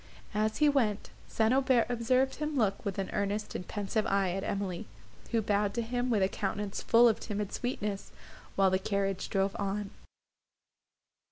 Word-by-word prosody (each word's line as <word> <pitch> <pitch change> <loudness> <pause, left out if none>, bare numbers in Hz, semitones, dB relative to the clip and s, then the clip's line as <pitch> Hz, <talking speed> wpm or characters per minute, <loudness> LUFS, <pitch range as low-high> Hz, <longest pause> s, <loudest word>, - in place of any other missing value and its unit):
As 215 +1 0
he 300 - +4
went, 235 -8 +1 0.2
St. 220 +2 +2
Aubert 260 -3 +4
observed 255 +2 +1
him 300 0 -2
look 205 -5 +1
with 200 -3 -3
an 195 -1 -2
earnest 205 +1 -1
and 180 - -5
pensive 210 +1 -1
eye 195 -2 +2
at 195 +2 -3
Emily, 200 0 -3 0.4
who 230 -2 +1
bowed 205 0 +1
to 235 - 0
him 245 +2 -1
with 215 -5 +3
a - - +4
countenance 200 0 -3
full 235 +1 +6
of 225 - +2
timid 210 -2 -4
sweetness, 210 -5 -3 0.4
while 195 -1 +4
the 185 - +2
carriage 195 -1 -1
drove 195 0 0
on. 200 0 -2
210 Hz, 170 wpm, -31 LUFS, 195-235 Hz, 0.4 s, full